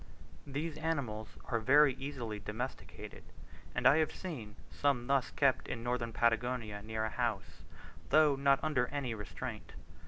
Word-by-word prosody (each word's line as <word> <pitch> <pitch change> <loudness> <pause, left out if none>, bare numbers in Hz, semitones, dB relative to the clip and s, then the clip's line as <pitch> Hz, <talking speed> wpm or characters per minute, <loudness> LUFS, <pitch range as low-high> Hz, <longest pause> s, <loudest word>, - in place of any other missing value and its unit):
These 150 +3 -3
animals 130 -10 -3
are 115 - 0
very 140 +4 +6
easily 125 -5 -5
domesticated, 110 +6 -6 0.5
and - - -1
I 145 - +8
have 160 -1 +2
seen 120 - -7 0.2
some 140 -4 +1
thus 135 0 +2
kept 135 -2 +2
in 115 - -4
northern 120 -1 -1
Patagonia 115 -2 0
near 110 +1 -2
a - - -1
house, 105 -9 -2 0.5
though 150 0 +6
not 140 0 +4
under 135 -6 +2
any 140 -5 -2
restraint. 105 -3 -6
125 Hz, 145 wpm, -34 LUFS, 110-140 Hz, 0.5 s, I